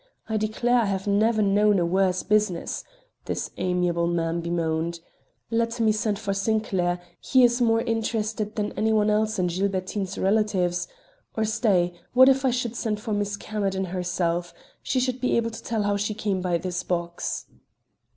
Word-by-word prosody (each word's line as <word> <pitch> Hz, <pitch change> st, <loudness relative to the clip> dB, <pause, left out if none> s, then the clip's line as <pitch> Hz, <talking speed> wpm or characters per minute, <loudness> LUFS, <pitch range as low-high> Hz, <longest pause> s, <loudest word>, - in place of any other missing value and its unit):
I 220 Hz, -, -2 dB
declare 220 Hz, +3 st, +1 dB
I 230 Hz, -, +2 dB
have 195 Hz, -1 st, -2 dB
never 215 Hz, +2 st, +3 dB
known 205 Hz, +1 st, +4 dB
a 175 Hz, -, +2 dB
worse 185 Hz, +1 st, +1 dB
business," 210 Hz, -5 st, 0 dB, 0.4 s
this -, -, -3 dB
amiable 180 Hz, -2 st, +1 dB
man 170 Hz, 0 st, -1 dB
bemoaned. 170 Hz, 0 st, -1 dB, 0.5 s
"Let 230 Hz, +1 st, 0 dB
me 220 Hz, -1 st, +4 dB
send 215 Hz, -1 st, 0 dB
for 200 Hz, -1 st, -2 dB
Sinclair; 195 Hz, -4 st, 0 dB, 0.2 s
he 260 Hz, -1 st, +3 dB
is 240 Hz, 0 st, +4 dB
more 225 Hz, -1 st, +3 dB
interested 220 Hz, -2 st, -2 dB
than 210 Hz, -1 st, -1 dB
any 220 Hz, +1 st, 0 dB
one 215 Hz, -1 st, +3 dB
else 215 Hz, 0 st, +1 dB
in 180 Hz, -, +1 dB
Gilbertine's 190 Hz, +1 st, -2 dB
relatives; 190 Hz, -3 st, +1 dB, 0.5 s
or 220 Hz, -, +2 dB
stay, 210 Hz, -6 st, +2 dB, 0.2 s
what 260 Hz, +1 st, +8 dB
if 270 Hz, 0 st, +2 dB
I -, -, +4 dB
should 245 Hz, -1 st, -2 dB
send 215 Hz, -2 st, -2 dB
for 215 Hz, 0 st, -3 dB
Miss 205 Hz, 0 st, -1 dB
Camerden 195 Hz, -3 st, -2 dB
herself? 175 Hz, -1 st, -2 dB, 0.3 s
She 260 Hz, -, 0 dB
should 255 Hz, 0 st, -1 dB
be 250 Hz, -, +2 dB
able 230 Hz, 0 st, 0 dB
to 225 Hz, -, -8 dB
tell 225 Hz, -2 st, -1 dB
how 205 Hz, 0 st, +1 dB
she 205 Hz, +1 st, -2 dB
came 200 Hz, -3 st, -1 dB
by 180 Hz, -2 st, +1 dB
this 180 Hz, +1 st, -3 dB
box." 170 Hz, -, -3 dB
205 Hz, 170 wpm, -25 LUFS, 180-220 Hz, 0.5 s, what